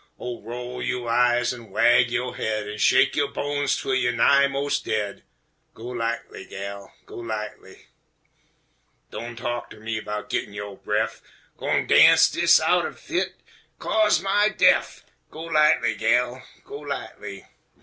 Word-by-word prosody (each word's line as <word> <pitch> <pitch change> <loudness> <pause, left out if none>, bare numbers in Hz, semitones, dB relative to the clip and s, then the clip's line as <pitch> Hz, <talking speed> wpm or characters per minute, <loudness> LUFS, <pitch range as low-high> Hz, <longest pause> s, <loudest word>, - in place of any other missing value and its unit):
Oh, 120 -1 -6
roll 125 +3 -7
yo' 125 -1 -2
eyes 120 +1 +2
an' 120 -3 -12
wag 120 +1 +4
yo' 125 +1 -2
haid 110 -1 -3
An' 105 0 -7
shake - - +4
yo' - - +1
bones 145 -1 -1
twel 135 - -2
you 125 -2 +2
nigh 140 +3 +4
most 140 +1 -2
daid, 105 -2 -3 0.5
Go 110 - -13
lightly, 115 -1 -4
gal, 100 0 -8
go - - -11
lightly! 110 -2 -7 1.3
Doan' 120 +1 -7
talk 120 0 -4
ter 110 - -13
me 110 0 -3
'bout 105 0 -5
gittin' 100 - -3
yo' 100 -1 -7
bref, 110 +2 -2 0.3
Gwine - - -1
darnse - - +6
dis - - +5
out - - +2
ef - - -13
hit - - -1 0.4
cause 215 -1 +2
my 205 +2 +3
def! - - +2 0.2
Go 160 - -9
lightly, 155 -2 +3
gal, 125 +1 +1 0.2
go 420 +3 -8
lightly! - - -7
120 Hz, 150 wpm, -24 LUFS, 110-135 Hz, 1.3 s, darnse